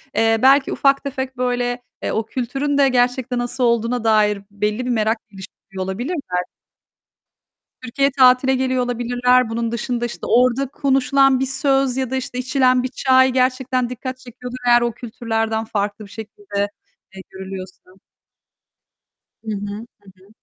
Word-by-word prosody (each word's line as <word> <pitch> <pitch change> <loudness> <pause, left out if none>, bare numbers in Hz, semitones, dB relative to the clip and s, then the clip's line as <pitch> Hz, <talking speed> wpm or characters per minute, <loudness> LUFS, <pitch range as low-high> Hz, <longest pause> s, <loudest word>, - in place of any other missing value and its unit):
eee, 225 0 +3
belki 270 +1 +5
ufak 275 0 +2
tefek 265 -2 -5
böyle, 245 0 -1 0.2
eee, - - -1
o 220 - -1
kültürün 270 +5 -2
de 275 -1 +5
gerçekte 250 0 +1
nasıl 245 +1 -2
olduğuna 235 0 +1
dair 210 -2 +3
belli 210 +4 -2
bir - - -3
merak 220 0 +1
geliştiriyor 190 -1 -9
olabilirler. 240 - -3 1.7
Türkiye'ye 275 +3 0
tatile 255 +1 +5
geliyor 255 -1 0
olabilirler. 245 0 +1
Bunun 230 0 -2
dışında 240 +1 -2
işte 240 - -6
orada 255 +2 +3
konuşulan 270 -1 +2
bir 265 - +1
söz 270 -1 +1
ya 260 -2 -1
da 265 - -2
işte 260 -1 -4
içilen 255 -1 +2
bir - - 0
çay 260 0 +3
gerçekten 255 -1 0
dikkat 255 +1 -6
çekiyordur, 250 0 -9
eğer 240 0 +6
o 240 0 0
kültürlerden 225 -1 -3
farklı 205 0 -3
bir - - -15
şekilde, 205 -2 -4 0.5
eee, 190 - -8
görülüyorsa. 190 -1 -9 1.5
Hı 220 - -3
hı. 205 0 -4 0.4
Hı 185 - -22
hı. - - -22
245 Hz, 145 wpm, -20 LUFS, 225-260 Hz, 1.7 s, eğer